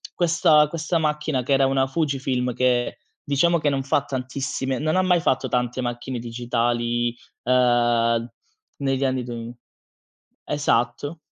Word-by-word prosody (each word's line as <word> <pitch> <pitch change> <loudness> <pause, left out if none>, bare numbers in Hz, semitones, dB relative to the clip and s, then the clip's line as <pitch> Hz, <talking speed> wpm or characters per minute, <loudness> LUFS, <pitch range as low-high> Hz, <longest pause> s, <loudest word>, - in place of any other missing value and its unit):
questa 165 -3 +4
questa 165 +2 -2
macchina, 150 -4 -1
che 140 - 0
era 135 0 +4
una 135 0 +2
Fujifilm 135 -4 -1
che, 125 -1 +1 0.3
diciamo 165 +4 +2
che 150 -1 +1
non 135 -1 -1
fa 140 0 +1
tantissime 130 0 -3
non 155 +3 0
ha 185 - +3
mai 180 -2 +3
fatto 130 -5 0
tante 125 +1 -1
macchine 120 +1 -4
digitali, 120 0 -1 0.3
uhm, 120 -2 +2 0.5
negli 135 -1 0
anni 130 -1 0
duemi 120 0 -7 0.9
esatto 145 +2 0
130 Hz, 135 wpm, -23 LUFS, 120-145 Hz, 0.9 s, questa